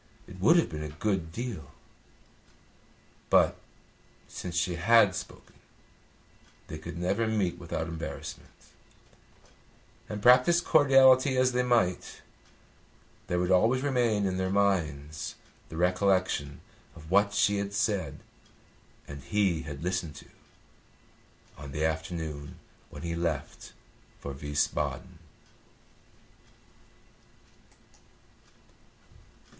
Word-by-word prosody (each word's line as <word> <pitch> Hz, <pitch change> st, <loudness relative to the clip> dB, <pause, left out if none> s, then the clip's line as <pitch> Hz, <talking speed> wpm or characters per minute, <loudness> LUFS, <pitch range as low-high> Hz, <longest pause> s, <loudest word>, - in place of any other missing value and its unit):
It 95 Hz, -, -12 dB
would 110 Hz, -, +5 dB
have 170 Hz, -, +3 dB
been 75 Hz, -2 st, -6 dB
a 75 Hz, -, -5 dB
good 85 Hz, +1 st, -2 dB
deal. 105 Hz, -, -6 dB, 1.6 s
But, -, -, +4 dB, 0.7 s
since 90 Hz, -2 st, -7 dB
she 90 Hz, +1 st, 0 dB
had 105 Hz, +1 st, +5 dB
spoken, -, -, -8 dB, 1.1 s
they 80 Hz, -, -8 dB
could 85 Hz, +2 st, -8 dB
never 100 Hz, +6 st, 0 dB
meet 105 Hz, -5 st, -1 dB
without 85 Hz, -2 st, -4 dB
embarrassment, 80 Hz, 0 st, -7 dB, 1.6 s
and, 105 Hz, -, -4 dB
practise 125 Hz, +10 st, +6 dB
cordiality 135 Hz, -4 st, +5 dB
as 130 Hz, 0 st, +3 dB
they 125 Hz, 0 st, +1 dB
might, 115 Hz, -8 st, 0 dB, 1.0 s
there 90 Hz, -2 st, -1 dB
would 90 Hz, +1 st, 0 dB
always 115 Hz, +8 st, +3 dB
remain 120 Hz, -7 st, +1 dB
in 95 Hz, -1 st, -1 dB
their 95 Hz, 0 st, -1 dB
minds 80 Hz, -7 st, -1 dB, 0.3 s
the 80 Hz, -, -8 dB
recollection 90 Hz, -5 st, +1 dB, 0.3 s
of 80 Hz, 0 st, -13 dB
what 100 Hz, +1 st, +4 dB
she 100 Hz, 0 st, +3 dB
had 100 Hz, 0 st, -3 dB
said 100 Hz, -8 st, -1 dB, 0.9 s
and 70 Hz, -1 st, -8 dB
he 85 Hz, +3 st, 0 dB
had 75 Hz, -1 st, -8 dB
listened 90 Hz, -4 st, -2 dB
to -, -, -12 dB, 1.3 s
on 70 Hz, -2 st, -9 dB
the 75 Hz, +2 st, 0 dB
afternoon 80 Hz, 0 st, -4 dB, 0.3 s
when -, -, -10 dB
he 85 Hz, -1 st, -3 dB
left 85 Hz, -4 st, -4 dB, 0.5 s
for 70 Hz, -, -6 dB
Wiesbaden. 75 Hz, +2 st, -2 dB
90 Hz, 105 wpm, -28 LUFS, 80-105 Hz, 1.6 s, practise